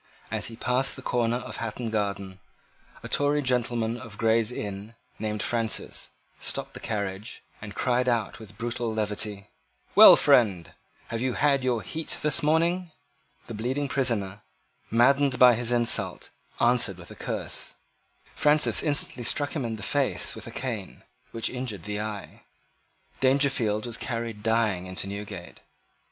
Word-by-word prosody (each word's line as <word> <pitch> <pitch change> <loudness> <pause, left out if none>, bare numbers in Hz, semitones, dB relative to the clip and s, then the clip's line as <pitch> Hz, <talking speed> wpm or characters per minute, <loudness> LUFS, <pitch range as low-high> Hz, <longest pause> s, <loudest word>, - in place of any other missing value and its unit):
As - - -1
he 115 - -8
passed 125 +3 0
the 130 - -9
corner 120 -2 +1
of 125 +1 -5
Hatton 115 0 -4
Garden, 100 -3 -2 0.6
a - - -5
Tory 145 +1 +1
gentleman 120 -2 0
of 115 -5 -10
Gray's 115 0 +2
Inn, 105 -1 -6 0.2
named 105 -1 -2
Francis, 115 -2 -1 0.3
stopped - - -3
the - - -7
carriage, 100 0 -4 0.2
and 105 -1 -8
cried 125 0 +1
out 115 -4 -1
with 105 -2 -12
brutal 120 0 -2
levity, 105 -2 -2 0.5
"Well, - - +11
friend, 95 -9 +3 0.4
have 115 0 -3
you 130 0 0
had 140 -1 +2
your 120 -4 0
heat 160 - -3
this 150 - +2
morning?" 170 +4 +2 0.6
The - - -7
bleeding 130 +6 -2
prisoner, 105 -8 -1 0.5
maddened 135 +3 +4
by 125 -1 +8
this 120 0 -2
insult, 120 -1 0 0.3
answered 120 -5 +3
with 90 -1 -12
a - - -10
curse. - - -5 0.6
Francis 150 0 +3
instantly 145 -4 0
struck 145 +6 0
him 145 - -1
in 115 -1 -3
the 105 - -8
face 140 +3 0
with - - -9
a - - -7
cane 115 -7 -5 0.3
which 115 -1 -2
injured 125 -8 -4
the 105 0 -3
eye. 105 -2 -6 0.8
Dangerfield 130 -6 +2
was 120 -1 -3
carried 115 -3 -4
dying 110 -5 +1
into 95 +1 -3
Newgate. 100 -2 -7
115 Hz, 150 wpm, -27 LUFS, 105-130 Hz, 0.8 s, Well